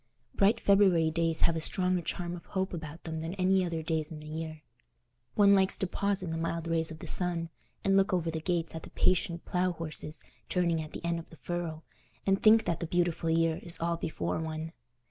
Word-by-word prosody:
Bright 210 +4 +3
February 190 -6 +4
days 165 0 +2
have 170 - +3
a - - -1
stronger 180 +2 +3
charm 175 +1 -4
of 170 - -12
hope 190 -1 -2
about 160 -1 -7
them 160 -1 -4
than 165 +3 -4
any 190 0 +3
other 165 -2 -3
days 160 -1 -1
in 155 - -7
the 150 - -11
year. 155 0 -6 0.7
One 200 -1 +6
likes 190 -1 +3
to - - 0
pause 200 +1 -1
in 170 - -4
the 165 - -2
mild 165 0 -2
rays 165 -1 +2
of 160 - -8
the - - -9
sun, 170 -2 +1 0.3
and 195 0 +3
look 195 +1 +3
over 170 -3 0
the 160 0 -4
gates 170 -1 -1
at 160 - -6
the - - -11
patient 170 -2 +1
plough 180 0 0
horses 155 -1 -4 0.3
turning 170 -3 +1
at 155 - -9
the - - -7
end 170 0 0
of 165 - -11
the 165 - -14
furrow, 170 -2 -4 0.4
and 195 0 +2
think 220 0 +6
that 170 - -1
the 170 - -3
beautiful 175 -1 0
year 165 0 +2
is 170 -1 +2
all 170 0 0
before 90 - -3
one. 160 0 -4
170 Hz, 220 wpm, -30 LUFS, 160-185 Hz, 0.7 s, One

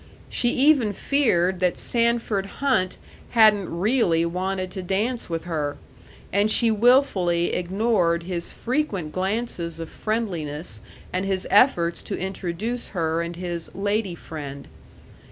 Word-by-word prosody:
She 240 - +1
even 265 -6 +4
feared 190 -10 +1
that 180 -1 +1
Sanford 230 -4 0
Hunt 250 -10 +1 0.4
hadn't 210 -4 +5
really 175 -3 +2
wanted 185 +2 -2
to 190 - -5
dance 210 +7 -2
with 165 -1 -3
her, 150 -4 -3 0.6
and 205 +2 +3
she 230 +1 +5
wilfully 205 -7 +3
ignored 180 -2 +1
his 175 -1 -2
frequent 235 - -2
glances 185 -4 -2
of 165 - -6
friendliness 165 - -4 0.3
and 185 +1 0
his 195 -1 -1
efforts 175 -6 +4
to - - -4
introduce 190 +5 -4
her 165 0 0
and 170 0 -4
his 175 -2 -5
"lady 205 -1 -1
friend." 140 -4 -8
185 Hz, 125 wpm, -24 LUFS, 170-225 Hz, 0.6 s, hadn't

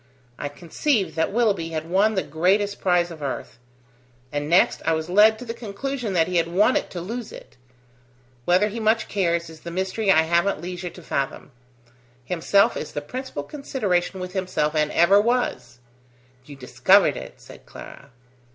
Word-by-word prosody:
I 145 - -3
conceived 175 - -1
that 160 +2 0
Willoughby 200 -7 +1
had 160 0 -4
won 200 +5 +2
the 190 - 0
greatest 195 +7 0
prize 175 -2 +2
of 160 -2 -10
earth. 140 -3 -5 0.7
And 145 0 -3
next 175 +3 +3
I 165 - +1
was 160 +2 -3
led 215 +3 +6
to 250 - -9
the 230 - -4
conclusion 235 +1 -4
that 165 -3 +2
he 180 -1 -1
had 165 0 +2
won 205 +8 +3
it - - -1
to 180 - -6
lose 230 +6 -6
it. - - -13 0.9
Whether 185 +4 +3
he 225 +3 -6
much 220 0 +1
cares, 170 -4 0
is 160 -1 -12
the 170 - -8
mystery 190 +4 -2
I 160 -4 +6
haven't 170 +3 +1
leisure 180 +1 -6
to 180 - -14
fathom. 140 -1 -3 0.7
Himself 180 +5 +2
is - - -6
the 145 - -3
principal 250 - -6
consideration 195 - -2
with 180 0 -6
himself, 180 -5 -1
and 150 -1 +1
ever 195 +5 +5
was." 235 - -1 0.7
"You 145 - -11
discovered 125 -2 +3
it!" - - -9
said - - -15
Clara. 140 - -12
180 Hz, 175 wpm, -23 LUFS, 160-210 Hz, 0.9 s, led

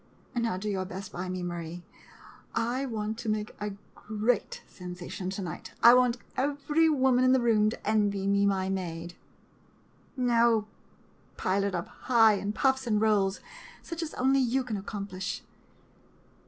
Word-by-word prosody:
Now 230 -5 0
do 205 +3 -5
your 190 -2 -1
best 190 +2 -7
by 180 +1 -5
me, 185 0 -3
Marie. 175 0 -5 0.7
I 245 +4 0
want 220 -1 -3
to 230 - -3
make 215 0 -2
a 210 -1 -3 0.2
great 215 +3 -1
sensation 180 +1 -7
to 195 +1 -4
night. 170 -4 -7
I 235 - +10
want 250 -1 +4 0.2
every 290 +4 +2
woman 260 -4 +3
in 255 0 +5
the 260 - +4
room 220 -3 +3
to 215 - -8
envy 205 -2 +1
me 200 0 +3
my 190 -1 +1
maid. 175 -3 -4 1.0
No 235 -3 +3 0.4
— - - -33
pile 195 +2 +1
it 200 -2 -1
up 170 - -3 0.2
high 225 -3 +7
in 200 0 -2
puffs 265 +2 +1
and 210 -2 +2
rolls, 205 -3 +2 0.4
such 335 -1 -5
as 325 - -5
only 265 +2 +3
you 260 +1 +1
can 235 -4 -4
accomplish. 195 -1 -5
210 Hz, 160 wpm, -29 LUFS, 190-245 Hz, 1.0 s, I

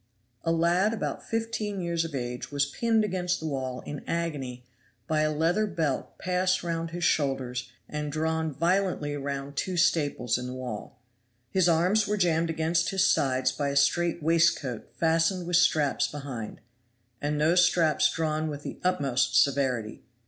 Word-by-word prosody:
A 165 - +1
lad 175 +6 +2
about 210 - -3
fifteen 225 -3 -2
years 170 -2 -1
of 165 -3 -5
age 125 0 -4
was 140 -1 +1
pinned 225 +9 +1
against 180 -2 -1
the 160 - -6
wall 130 -4 -3
in 145 - -7
agony 140 -7 -3 0.4
by 155 -1 +1
a 155 0 +2
leathern 175 +7 0
belt 150 -6 -2
passed 185 +1 0
round 165 -1 -2
his 175 +1 -5
shoulders 130 -5 0 0.2
and 150 -1 -4
drawn 160 +1 -1
violently 170 -1 0
round 140 0 -4
two 185 +4 -2
staples 145 -8 +1
in 125 - -5
the 125 - -5
wall. 125 -2 -7 0.5
His 185 -2 +3
arms 180 +6 +3
were 210 - 0
jammed 170 -3 +2
against 165 +2 +1
his 190 -1 +2
sides 130 -5 +2
by 145 -1 -2
a 140 - -3
straight 165 +4 +2
waistcoat 160 -7 +1
fastened 165 +2 +2
with 175 0 +2
straps 155 -5 +3
behind, 135 -8 -7 0.6
and 150 0 -1
those 170 +4 +4
straps 170 -3 +3
drawn 155 -1 -1
with 145 -1 -5
the - - -7
utmost 140 -7 +2
severity. 130 -6 0
160 Hz, 160 wpm, -27 LUFS, 140-175 Hz, 0.6 s, those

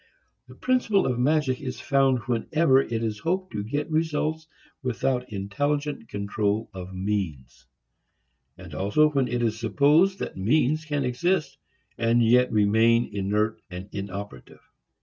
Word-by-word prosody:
The 125 - -14
principle 235 - +1
of 125 -2 -1
magic 140 -1 +1
is 130 -3 -5
found 135 -2 +2
whenever 135 +4 +2
it 115 -3 -3
is 105 -2 -2
hoped 185 - -2
to 105 - -3
get 145 +8 -3
results 155 0 -1 0.3
without 125 0 -1
intelligent 145 +7 -2
control 105 +2 -2
of 95 0 -8
means; 80 -11 -4 0.9
and 90 -3 -11
also 105 - +2
when 135 -3 +1
it 120 0 -1
is 110 -1 -1
supposed 150 - +3
that - - -5
means 150 +9 +1
can 145 -3 -1
exist 155 +8 -1 0.4
and 115 +1 +3
yet 125 +2 +4
remain 110 +2 +3
inert 105 +2 -1
and 90 +2 -8
inoperative. 100 0 -8
120 Hz, 135 wpm, -25 LUFS, 105-150 Hz, 0.9 s, yet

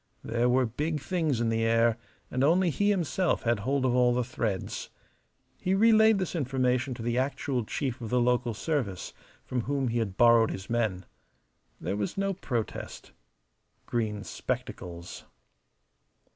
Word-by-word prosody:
There 120 +2 +1
were 130 +1 +3
big 150 +7 -2
things 160 -6 -1
in 115 -1 +1
the 115 0 0
air, 115 0 +3 0.4
and 130 - 0
only 170 +4 +4
he 205 +7 +1
himself 185 -2 +1
had 115 -2 +1
hold 130 +5 0
of 125 - +2
all 125 -1 +4
the 125 - +1
threads. 110 -5 -3 0.7
He 185 +1 +1
relayed 220 0 +6
this 185 -2 -2
information 130 -3 0
to 115 - -7
the 120 +1 0
actual 130 -1 -1
chief 130 +2 -3
of 115 - -5
the 125 - +2
local 120 -1 +1
service, 115 - -2 0.3
from 125 -1 -1
whom 135 +1 -1
he 120 +1 0
had 100 -4 -3
borrowed 115 -2 +6
his 95 +5 -6
men. 110 -6 0 0.7
There - - -2
was 105 - -3
no 195 0 0
protest. 120 - -4 0.7
Green 105 -3 -2
spectacles. 85 -2 -5
125 Hz, 155 wpm, -28 LUFS, 115-145 Hz, 0.7 s, relayed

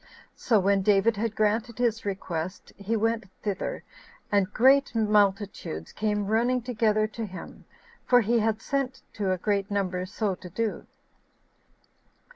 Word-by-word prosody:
So 220 -4 +2
when 195 +1 +2
David 205 +3 +3
had 220 +1 -2
granted 220 +2 0
his 230 -3 0
request, 185 -3 -4
he 205 +3 -2
went 225 0 0 0.2
thither, 205 -3 -3 0.5
and 200 -2 +2
great 270 +3 +4
multitudes 205 - +1
came 210 -1 -1
running 240 +4 +1
together 220 -3 +1
to 225 0 -5
him, 185 -1 -10 0.4
for 245 -1 +6
he 235 +2 +2
had 220 0 0
sent 275 -2 -2
to 200 -3 -1
a 185 - +1
great 200 +1 -1
number 185 -3 -1
so 200 +1 -1
to 180 0 -10
do. 220 +4 -3
210 Hz, 140 wpm, -27 LUFS, 195-230 Hz, 0.5 s, for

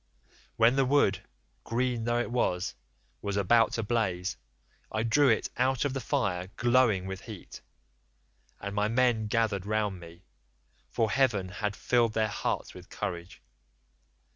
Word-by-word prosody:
When 115 +3 +4
the 135 - +4
wood, 130 -8 +3 0.4
green 120 0 -1
though 120 0 +1
it 120 - -2
was, 90 -7 0 0.5
was 100 -1 -2
about 115 +3 +4
to 115 - -1
blaze, 100 -5 -1 0.6
I 110 - -1
drew 135 +5 +4
it 110 - +1
out 130 +1 +1
of 140 - -1
the 135 - -2
fire 100 -10 -1
glowing 120 -6 +3
with 95 0 -6
heat, 110 -6 -10 1.0
and 100 0 -5
my 105 +1 +1
men 115 -1 +2
gathered 105 -3 0
round 105 -3 -1
me, 85 +1 -13 0.7
for 110 -2 0
heaven 110 -7 +2
had 105 +1 -3
filled 120 -1 +2
their 110 -1 +1
hearts - - -3
with - - -13
courage. 85 -5 -6
110 Hz, 145 wpm, -29 LUFS, 100-120 Hz, 1.0 s, When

